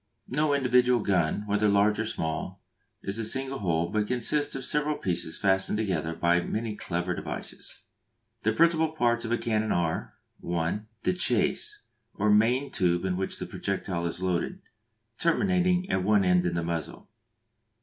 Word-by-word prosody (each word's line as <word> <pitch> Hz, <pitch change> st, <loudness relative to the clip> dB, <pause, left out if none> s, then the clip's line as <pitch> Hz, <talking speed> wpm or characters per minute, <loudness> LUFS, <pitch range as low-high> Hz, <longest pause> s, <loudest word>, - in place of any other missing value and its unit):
No 145 Hz, +2 st, +2 dB
individual 125 Hz, -2 st, +3 dB
gun, 95 Hz, -1 st, +1 dB
whether 105 Hz, 0 st, +2 dB
large 100 Hz, +1 st, +3 dB
or 115 Hz, -, -1 dB
small, 80 Hz, +2 st, -3 dB, 0.4 s
is 100 Hz, +3 st, -2 dB
a -, -, -1 dB
single 135 Hz, +4 st, -1 dB
whole, 85 Hz, -3 st, 0 dB
but 105 Hz, -1 st, 0 dB
consists 145 Hz, +5 st, 0 dB
of 135 Hz, -1 st, -3 dB
several 150 Hz, 0 st, +1 dB
pieces 85 Hz, -3 st, -2 dB
fastened 95 Hz, +1 st, +1 dB
together 85 Hz, -6 st, -1 dB
by 85 Hz, +1 st, +2 dB
many 110 Hz, +4 st, -3 dB
clever 90 Hz, -2 st, -2 dB
devices. -, -, -7 dB, 0.6 s
The 110 Hz, -, +2 dB
principal 160 Hz, +4 st, +3 dB
parts 120 Hz, -5 st, +1 dB
of 115 Hz, -, -4 dB
a 120 Hz, -, +2 dB
cannon 110 Hz, -2 st, 0 dB
are: 85 Hz, -2 st, -1 dB, 0.2 s
(1) 85 Hz, +5 st, -2 dB, 0.2 s
The -, -, +2 dB
chase, 415 Hz, -, 0 dB, 0.3 s
or 105 Hz, +1 st, +2 dB
main 120 Hz, +6 st, +3 dB
tube 90 Hz, -2 st, +1 dB
into 90 Hz, -1 st, -1 dB
which 95 Hz, -, -3 dB
the -, -, -5 dB
projectile 95 Hz, -3 st, -3 dB
is 90 Hz, +2 st, -5 dB
loaded; 95 Hz, -, -1 dB, 0.6 s
terminating 180 Hz, +1 st, +2 dB
at 95 Hz, -, +1 dB
one 105 Hz, 0 st, +3 dB
end 90 Hz, 0 st, +3 dB
in 85 Hz, -, -2 dB
the 85 Hz, -, -1 dB
muzzle. 85 Hz, -2 st, -4 dB
105 Hz, 160 wpm, -27 LUFS, 90-130 Hz, 0.6 s, individual